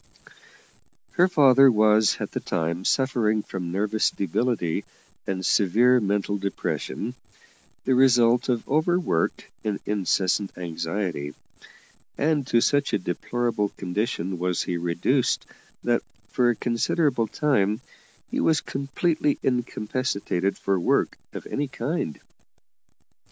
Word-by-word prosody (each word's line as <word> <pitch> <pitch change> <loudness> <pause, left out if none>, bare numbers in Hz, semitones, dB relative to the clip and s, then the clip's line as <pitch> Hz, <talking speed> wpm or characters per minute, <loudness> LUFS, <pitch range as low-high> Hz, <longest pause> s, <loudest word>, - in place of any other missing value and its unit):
Her 180 0 +4
father 135 -6 +6
was 110 -1 +4
at - - -4
the - - -2
time 85 +3 -2
suffering 115 -5 +1
from 90 -4 -5
nervous 105 +3 +1
debility 100 -2 -1 0.4
and 95 -1 -2
severe 120 +8 +4
mental 100 -1 -1
depression, 95 - -3 0.7
the 130 - +3
result 125 -1 +4
of 120 -2 -1
over 160 +5 +2
work 80 - -1
and 105 -2 -2
incessant 100 -1 0
anxiety; 85 -3 -3 0.8
and 145 -3 +1
to 115 -2 +3
such 145 +2 +1
a - - +4
deplorable 105 +3 -2
condition 95 -2 -2
was 90 -1 0
he 90 - -3
reduced 90 +10 0 0.4
that, - - +2 0.3
for 125 -1 +2
a 120 - +2
considerable 120 +2 0
time, 110 -7 +1 0.5
he - - -1
was 160 -2 +3
completely 145 +2 -1
incapacitated 110 -6 -1
for 95 -1 0
work - - +1 0.2
of - - -8
any 145 +1 -2
kind. 125 - -3
110 Hz, 115 wpm, -25 LUFS, 95-130 Hz, 0.8 s, father